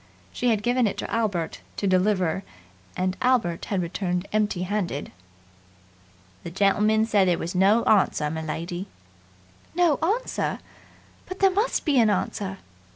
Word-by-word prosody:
She 245 - 0
had 215 -3 +1
given 245 -1 +2
it 200 - -3
to - - -5
Albert 200 -8 -1 0.2
to - - -2
deliver 185 -2 +2 0.6
and 185 0 0
Albert 245 -10 +1
had 190 -3 -1
returned 180 +1 -2
empty 210 -4 0
handed. 185 -6 -3 1.3
"The - - -5
gentleman 210 +4 +2
said 205 -4 +3
there 175 -2 +2
was 170 +2 -4
no 195 +5 +4
answer, 170 -7 +2
m'lady!" 165 +4 -4 0.9
"No 345 -4 +3
answer! 420 +10 -1 0.7
But 370 - -6
there 390 -1 +4
must 420 +6 0
be 285 -5 +3
an 225 -2 +4
answer!" 195 -1 -2
200 Hz, 140 wpm, -25 LUFS, 180-230 Hz, 1.3 s, no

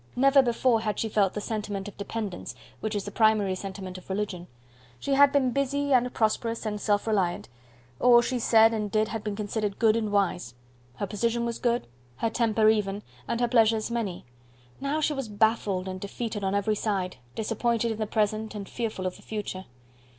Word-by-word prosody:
Never 275 +2 +6
before 240 -2 +2
had 215 -2 -2
she 225 - -1
felt 200 -3 +2
the 210 - -2
sentiment 210 -3 -4
of 205 - -9
dependence, 200 -2 -5 0.2
which 215 0 -3
is 205 - -1
the 205 - -5
primary 215 -3 +3
sentiment 190 -1 -6
of 180 - -20
religion. 190 -3 -3 0.5
She 280 - -1
had 280 0 +6
been 270 -3 +2
busy, 280 +1 0
and 250 -1 +3
prosperous, 230 0 0
and 210 -1 -3
self 205 -1 +1
reliant; 195 - 0 0.5
all 245 -1 +7
she 250 +1 -1
said 225 0 +5
and 210 -2 -2
did 215 +1 +1
had 220 -2 -4
been 210 -1 -3
considered 210 -1 -2
good 225 -2 +4
and 220 -2 -1
wise; 180 - 0 0.4
her 200 - -2
position 235 +4 -1
was 235 -1 -3
good, 240 0 +1 0.3
her 225 - -1
temper 220 -2 +2
even, 210 -2 +1 0.2
and 235 0 -1
her 240 - +3
pleasures 225 -1 +3
many. 220 -7 -3 0.5
Now 285 +3 -1
she 305 0 +1
was 270 -5 -4
baffled 205 -3 +1
and 185 0 -5
defeated 210 +1 -4
on 195 +1 0
every 205 +2 +1
side 195 - -2 0.2
disappointed 230 +1 0
in 220 - -5
the 215 - -1
present, 215 0 -1
and 200 -2 -6
fearful 220 -5 -4
of 185 - -3
the - - -17
future. 205 -3 -5
215 Hz, 195 wpm, -27 LUFS, 200-235 Hz, 0.5 s, all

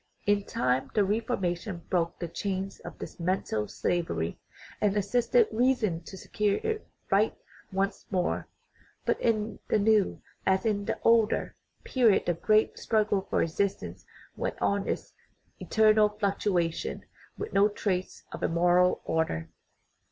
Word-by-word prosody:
In 205 -1 +2
time 125 +1 0
the 210 - +4
Reformation 195 -4 -2
broke 170 -2 +1
the 170 - -4
chains 190 +3 -3
of - - -10
this - - -9
mental 170 - -1
slavery, 165 - -2 0.4
and 210 -1 +2
assisted 245 - +3
reason 225 -8 +1
to 190 - -9
secure 205 +2 0
its 440 -1 -1 0.3
right 205 +3 +3 0.3
once 195 +1 -2
more. 185 -3 -1 0.6
But - - 0
in 220 -1 0
the - - +2
new, 210 -1 +3 0.2
as 190 +3 +2
in 205 -2 0
the - - -2
older, 230 -2 +3 0.3
period 235 -6 +3
the 175 - +2
great 215 +6 +2
struggle 210 -3 +1
for - - +2
existence 160 - -2 0.3
went - - -3
on 200 0 0
in - - +2
its - - -11 0.5
eternal 215 -1 +4
fluctuation, 200 -5 -1 0.3
with 425 - -5
no 200 +1 +5
trace 190 -3 -3
of - - -7
a - - +2
moral 175 +2 +3
order. 120 - -1
200 Hz, 140 wpm, -28 LUFS, 175-215 Hz, 0.6 s, no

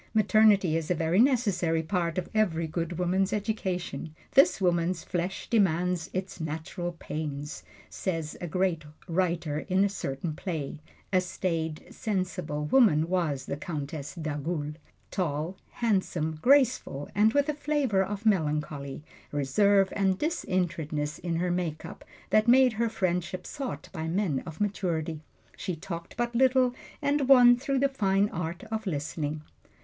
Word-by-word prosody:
Maternity 210 -5 +5
is 165 -1 -2
a 180 - +2
very 165 +3 +1
necessary 200 -11 +2
part 170 -1 -1
of 185 - -1
every 180 -7 +1
good 165 +1 -3
woman's 185 +2 +1
education 190 -6 -3 0.2
"this 275 -4 +5
woman's 175 -1 +1
flesh 180 +2 -3
demands 180 -5 +1
its 185 0 -4
natural 165 +3 -4
pains," 150 -3 -5 0.3
says 165 -5 -3
a 175 - -3
great 180 -1 0 0.2
writer 170 -4 0
in 190 +2 +4
a - - +1
certain 155 -4 -4
play. 155 -3 -4 0.3
A 185 - +5
staid, 165 -4 -3
sensible 185 -7 -2
woman 165 - +4
was 155 -8 0
the - - -3
Countess 150 -1 -5
d'Agoult 150 -1 -3 0.3
tall, 165 -1 -2
handsome, 180 -8 -1
graceful, 255 - +3
and 215 +2 +4
with 285 0 +3
a 300 - +1
flavor 285 -9 +1
of 205 +2 -5
melancholy, 150 -7 0 0.3
reserve 195 +8 +3
and 190 -2 +2
disinterestedness 170 - -1
in 170 -1 -2
her 175 +2 0
make 170 -3 -2
up - - -9 0.3
that 215 +2 +4
made 255 0 +6
her 230 +1 0
friendship 180 -2 -2
sought 255 - -5
by 160 0 -4
men 165 -5 0
of 160 -2 -8
maturity. 170 -6 -1 0.3
She 185 -3 -3
talked 170 +1 -7
but 240 0 -1
little, 255 0 +4 0.3
and 285 -1 +1
won 245 -2 +8
through 275 +2 -1
the 275 +1 +4
fine 200 -6 +1
art 170 +4 -4
of 220 -1 -3
listening. 150 -1 -3
180 Hz, 145 wpm, -28 LUFS, 160-210 Hz, 0.3 s, won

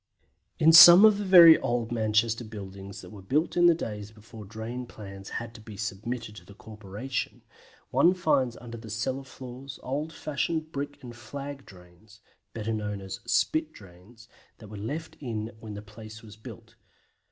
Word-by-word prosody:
In 160 - +5
some 175 +4 +11
of 210 -2 +5
the - - -2
very 175 -4 +8
old 120 -1 -2
Manchester 115 +1 0
buildings 100 -3 -9
that - - -13
were 105 -2 -11
built 145 - -1
in 175 0 +5
the 170 - +5
days 105 -9 -6
before 110 0 -13
drain 115 +4 -7
plans 100 -3 -11
had 115 0 -7
to 115 - -13
be 105 -2 -11
submitted 110 +2 -5
to - - -12
the 100 - -16
corporation, 110 +4 -6 0.5
one 180 +2 +4
finds 135 -9 0
under 120 -1 -9
the 110 -1 -11
cellar 130 +5 -3
floors 130 0 -10
old 145 +5 -4
fashioned 155 +1 -3
brick 145 -1 -6
and 120 -1 -10
flag 140 +4 -9
drains 90 +3 -18 0.3
(better 110 0 -4
known 105 -2 -4
as 95 -1 -7
"spit" 155 0 0
drains), 100 +5 -17 0.3
that 110 - -13
were 105 - -9
left 145 +11 -6
in 115 -5 -5
when 110 -2 -9
the 105 - -8
place 110 +2 -12
was 105 -2 -13
built. 115 0 -13
115 Hz, 175 wpm, -27 LUFS, 105-135 Hz, 0.5 s, some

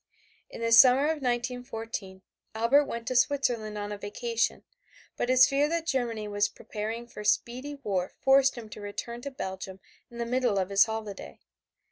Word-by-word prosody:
In - - -9
the 230 0 0
summer 250 +3 +8
of 310 0 0
1914, 240 -6 -4 0.3
Albert 245 +6 +4
went 235 -3 -5
to 255 - -3
Switzerland 245 -5 +1
on 205 0 -4
a 205 - -5
vacation, 230 +3 -2 0.5
but 245 - -2
his 255 0 +7
fear 285 +2 +1
that 335 0 -1
Germany 235 -8 -1
was 205 0 +1
preparing 220 +2 -6
for 220 -3 -10
speedy 245 +6 0
war 185 -3 -1
forced 270 0 +4
him 230 -2 -8
to 210 - -10
return 235 +4 -6
to 280 - -5
Belgium 190 -6 -6 0.3
in 235 - -12
the 235 - -2
middle 245 -3 +1
of 190 -1 0
his 200 0 +6
holiday. 215 - -6
235 Hz, 170 wpm, -28 LUFS, 210-255 Hz, 0.5 s, summer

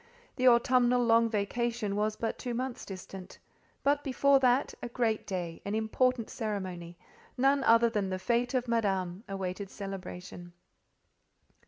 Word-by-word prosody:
The 255 - +2
autumnal 245 0 +4
long 230 0 +4
vacation 220 0 -1
was 210 +1 0
but 225 - -3
two 245 -2 -4
months 255 0 -4
distant; 190 -1 -9 0.5
but 285 +1 +2
before 275 +1 +3
that, 255 +1 +2
a 245 - -5
great 230 -3 -1
day—an 185 +2 -4
important 230 +2 +1
ceremony—none 205 +6 -3
other 230 -1 +5
than 210 -4 -1
the 185 - -1
fête 240 +7 0
of 250 -1 0
Madame—awaited 195 -3 -2
celebration. 180 -3 -8
225 Hz, 125 wpm, -30 LUFS, 195-245 Hz, 0.5 s, other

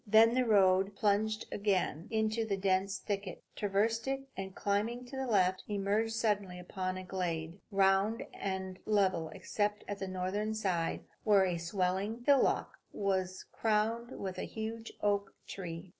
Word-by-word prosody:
Then 220 +2 +7
the 255 0 +2
road 195 -1 +4
plunged 215 +1 +1
again 190 -4 0
into 220 0 0
a 195 - +2
dense 195 0 +1
thicket, 200 -3 -4
traversed 215 +4 +1
it, 270 0 -2
and 190 0 -6
climbing 220 +5 -1
to 245 - -9
the 265 0 -2
left, 185 -4 +2
emerged 210 +2 0
suddenly 205 -5 0
upon 185 +1 -3
a 185 - -5
glade, 175 -2 -3
round 195 +2 +3
and 190 -1 -4
level 190 -6 +2
except 205 +6 -2
at 205 -1 -4
the 195 - -3
northern 190 +4 -2
side, 180 -6 -1 0.2
where 200 -3 +5
a 175 -2 -1
swelling 190 +6 -1
hillock 280 -2 +3
was 190 -2 -1
crowned 225 +3 0
with 185 -2 -4
a - - -2
huge 225 +1 -5
oak 200 -1 +1
tree. 175 -1 -6
200 Hz, 150 wpm, -33 LUFS, 185-220 Hz, 0.2 s, Then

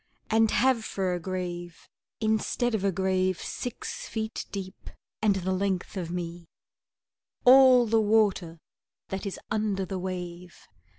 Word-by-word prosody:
And 220 0 +4
have 255 0 +2
for 190 -3 -1
a 175 - -2
grave, 175 -1 -5 0.3
instead 220 +2 0
of 210 -3 -1
a 200 - +2
grave 185 -1 0
Six 245 -2 -5
feet 220 0 -4
deep 190 -1 -7 0.3
and 210 -2 +3
the 190 0 -2
length 190 0 -1
of 180 -4 -4
me, 170 -1 -5 1.0
All 255 -1 +8
the 225 0 +3
water 205 -6 +2 0.5
that 195 +1 -4
is 195 - -4
under 210 -3 0
the 185 +1 -4
wave! 180 -1 -6
195 Hz, 135 wpm, -27 LUFS, 180-220 Hz, 1.0 s, All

